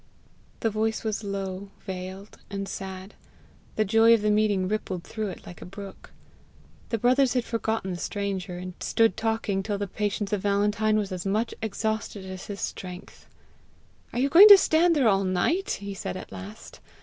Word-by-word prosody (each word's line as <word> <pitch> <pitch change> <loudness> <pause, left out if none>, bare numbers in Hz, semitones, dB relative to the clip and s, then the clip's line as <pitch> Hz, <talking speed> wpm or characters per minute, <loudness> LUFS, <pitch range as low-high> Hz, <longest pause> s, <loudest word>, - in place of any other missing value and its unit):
The 225 - +1
voice 220 +1 -1
was 220 -1 -2
low, 195 -1 -4 0.2
veiled, 190 +1 -7
and 195 0 -4
sad; 190 0 -7 0.6
the 215 - +2
joy 225 +3 +6
of 215 - -2
the 210 - +3
meeting 210 -3 +2
rippled 190 -4 -3
through 215 +1 -4
it 185 - -8
like 175 - -11
a - - -6
brook. 195 +1 -10 0.8
The 230 - 0
brothers 255 +3 +3
had 245 -2 +1
forgotten 225 -4 -2
the 175 - -4
stranger, 195 -3 -3
and 180 0 -6
stood 225 -4 +2
talking 220 -3 -1
till 205 +1 -2
the 205 - -2
patience 205 +1 -2
of 205 - 0
Valentine 210 +2 +2
was 205 -2 -2
as 180 -1 -4
much 215 +4 0
exhausted 220 -2 -3
as 185 -1 -8
his 200 -1 -6
strength. 180 0 -7 0.8
"Are - - -6
you 270 +3 +2
going 375 +8 +10
to 405 -1 +12
stand 335 -1 +3
there 270 -6 +3
all 195 -2 +3
night?" 190 - 0
he 200 0 -5
said 195 - -5
at - - -9
last. 95 +2 -10
205 Hz, 180 wpm, -26 LUFS, 190-220 Hz, 0.8 s, to